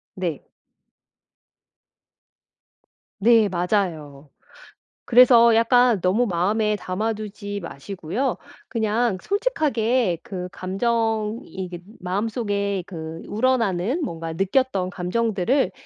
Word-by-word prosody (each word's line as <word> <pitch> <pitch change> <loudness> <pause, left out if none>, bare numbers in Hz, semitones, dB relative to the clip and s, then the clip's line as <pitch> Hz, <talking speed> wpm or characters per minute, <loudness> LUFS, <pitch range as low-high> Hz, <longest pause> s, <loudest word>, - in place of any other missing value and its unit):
네. 175 -6 -4 2.7
네 220 0 +5
맞아요. 170 -6 -2 0.8
그래서 235 -2 +7
약간 235 -2 +4
너무 195 +8 +2
마음에 210 +3 +1
담아 210 +3 -2
두지 205 -1 -6
마시고요. 185 - -3 0.3
그냥 220 -1 0
솔직하게 260 - 0
그 185 -6 -6
감정 220 +3 -1
이게 180 -2 -7 0.2
마음속에 200 0 -2
그 160 -2 -7
우러나는 230 - +1
뭔가 165 - -4
느꼈던 195 +1 0
감정들을 215 +7 0
205 Hz, 195 characters per minute, -23 LUFS, 180-235 Hz, 2.7 s, 그래서